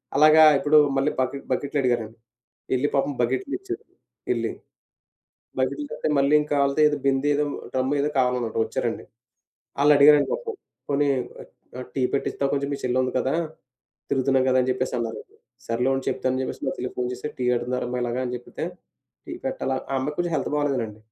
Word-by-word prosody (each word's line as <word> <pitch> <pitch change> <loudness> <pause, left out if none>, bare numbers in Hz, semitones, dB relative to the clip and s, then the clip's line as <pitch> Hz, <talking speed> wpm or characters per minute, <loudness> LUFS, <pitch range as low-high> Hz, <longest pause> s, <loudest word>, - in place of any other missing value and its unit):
అలాగా 155 +2 +7
ఇప్పుడు 145 +2 +4 0.2
మళ్ళీ 135 +3 +2
బకెట్ 135 +2 -2
బకెట్లడిగారండి. 125 -5 -1 0.6
యెళ్లి 130 +3 +2
పాపం 140 +1 +1
బకెట్లు 130 - -1
ఇచ్చారు 390 +3 -6 0.5
యెళ్లి. - - -1 1.1
బకెట్లు 295 - -1
తరవాత - - -4
మళ్ళీ 140 +2 +3
ఇంకాలీదేదో 150 +1 +2
బిందేదో, 145 +2 +2 0.3
డ్రమ్ 130 +2 0
ఏదో 150 +1 0
కావాలనంట 125 -3 0
వచ్చారండి. - - -3 0.8
ఆళ్ళు 150 +1 +6
అడిగారండి 145 0 +6
పాపం. 460 -2 -4 0.3
"పోనీ, 145 0 +2 0.7
ఆ! - - -4
టీ 135 - 0
పెట్టిస్తావా? 140 0 -1
కొంచెం 140 0 -1
మీ - - -3
చెల్లి 125 0 0
ఉంది 130 - -1
కదా! 130 - 0 0.8
తిరుగుతున్నాం 135 -1 +2
కదా," 130 - +3
అని 125 - -1
చెప్పేసి 130 0 -2
అన్నారొకరు. 115 -1 -6 0.3
సర్లే 120 +3 +1
ఉండు 135 0 -2
చెప్తాను 130 0 -1
అని 130 - -1
చెప్పేసి - - -5
మా - - 0
చెల్లికి 125 - -4
ఫోను 125 0 -1
చేసి 125 +4 -5
టీ 125 - -1
అడుగుతున్నారమ్మ 125 +1 -2
ఇలాగా 120 +1 -2
అని 125 - -4
జెబితే, 120 - -6 0.6
టీ - - -8
పెట్టాలా 135 - -1 0.2
ఆ 135 - 0
అమ్మాయికి 150 +3 -3
కొంచెం 175 -1 -1
హెల్త్ - - -3
బాగోలేదనండి. 130 -8 -1
135 Hz, 160 wpm, -24 LUFS, 125-145 Hz, 1.1 s, అలాగా